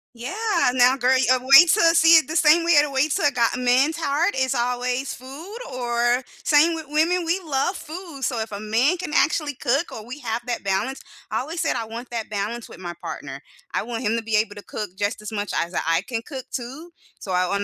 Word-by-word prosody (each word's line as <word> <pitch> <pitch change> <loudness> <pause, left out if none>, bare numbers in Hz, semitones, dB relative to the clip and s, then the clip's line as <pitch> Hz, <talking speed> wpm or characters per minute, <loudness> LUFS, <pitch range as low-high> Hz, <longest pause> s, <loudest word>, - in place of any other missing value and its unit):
Yeah, 245 +9 -6 0.4
now, 255 +1 +4
girl, 255 0 +3 0.2
uh, 255 - +5
wait 275 +7 +7
'til 390 - +4
I 330 0 +5
see 330 0 +7
it 320 - +2
the 315 - -5
same 330 +1 +5
way 310 -4 +6
the 295 - -2
way 270 +2 +1
to - - -1
a - - +1
guy 240 -4 +2
a 245 - -3
man's 255 +5 +2
heart 325 +4 0
is 260 0 0
always 250 +2 -1
food 295 - -10
or 240 0 0 0.2
same 305 +3 +4
with 320 -2 -6
women, 330 +4 +1
we 340 +3 0
love 295 +5 0
food, 320 -3 -9
so 245 -2 -1
if 220 0 -4
a 200 - -5
man 230 - +1
can 340 -4 -6
actually 300 -2 +1
cook 275 +6 -1
or 215 - -8
we 250 +5 -8
have 230 -1 -3
that 245 - -3
balance 200 +8 -2 0.3
I - - -1
always 320 +6 -5
said - - 0
I 225 - -3
want 235 +3 -8
that 230 -2 -4
balance 215 +3 -4
with - - -13
my 175 -2 -6
partner. 140 -5 -7 0.3
I - - -1
want 230 +1 -5
him 220 0 +1
to 230 - -3
be 220 -1 -1
able 210 -1 -1
to 205 - -10
cook 210 -4 -6
just 205 +2 -2
as 210 - -7
much 205 -2 -4
as 170 +1 -2
I 165 +1 +1
can 230 -3 -4
cook 265 -4 -7
too. 270 +7 -6 0.3
So 190 - -7
I 180 0 +2
on 200 +2 -1
255 Hz, 240 wpm, -23 LUFS, 225-305 Hz, 0.4 s, wait